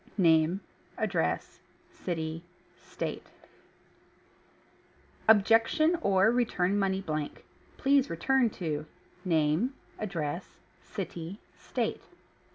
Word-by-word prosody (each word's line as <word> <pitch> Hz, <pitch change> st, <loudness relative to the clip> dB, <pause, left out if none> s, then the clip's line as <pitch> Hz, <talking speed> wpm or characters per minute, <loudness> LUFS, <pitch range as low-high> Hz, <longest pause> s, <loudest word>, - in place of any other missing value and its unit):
Name 165 Hz, 0 st, +4 dB, 0.4 s
Address. -, -, -1 dB, 0.3 s
City 160 Hz, -2 st, -4 dB, 0.3 s
State... -, -, -6 dB, 2.0 s
Objection, 225 Hz, -, +5 dB
or 195 Hz, 0 st, +4 dB
return 205 Hz, -5 st, +1 dB
money 190 Hz, -1 st, +1 dB
blank. 155 Hz, -5 st, -4 dB, 0.3 s
Please 275 Hz, 0 st, +3 dB
return 255 Hz, +8 st, +2 dB
to 155 Hz, -6 st, -4 dB, 0.4 s
Name 165 Hz, -, +2 dB, 0.2 s
Address. 170 Hz, -4 st, -4 dB, 0.2 s
City 185 Hz, -2 st, -6 dB, 0.2 s
State -, -, -3 dB
190 Hz, 75 wpm, -30 LUFS, 160-225 Hz, 2.0 s, Objection